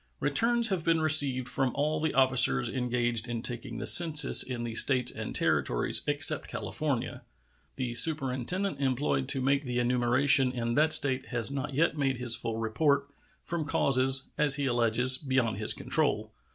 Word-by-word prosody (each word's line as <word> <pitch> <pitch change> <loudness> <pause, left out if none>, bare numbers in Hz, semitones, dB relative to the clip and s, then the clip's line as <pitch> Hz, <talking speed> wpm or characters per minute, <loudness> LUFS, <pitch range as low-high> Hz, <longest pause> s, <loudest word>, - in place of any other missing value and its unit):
Returns 235 +10 +1
have 185 -4 -4
been 165 0 -1
received 145 -5 +3
from 125 +1 -2
all 150 +2 -3
the 160 0 -4
officers 130 -2 +3
engaged 120 -2 -3
in 115 -1 -6
taking 120 -1 -5
the - - -7
census 155 -4 +6
in 125 -2 -3
the 115 -1 -7
States 125 +1 +2
and - - -9
Territories - - -1
except - - +2
California. - - -6 0.5
The 125 -2 -6
superintendent 140 +6 +2
employed 130 - -3
to 135 - +3
make 140 +2 -1
the 125 -2 -6
enumeration 125 +2 +1
in 120 -1 -5
that 155 +4 0
State 130 -3 +2
has 120 0 -3
not 140 0 -7
yet 160 0 -2
made 135 -2 -2
his 120 -1 0
full 115 -1 -6
report, 140 +6 -2 0.3
from 170 -2 -6
causes, 135 -2 0
as 145 -2 +4
he 140 -1 -3
alleges, 120 +1 +2
beyond 130 -7 -3
his 105 - +1
control. - - -3
130 Hz, 165 wpm, -26 LUFS, 120-145 Hz, 0.5 s, census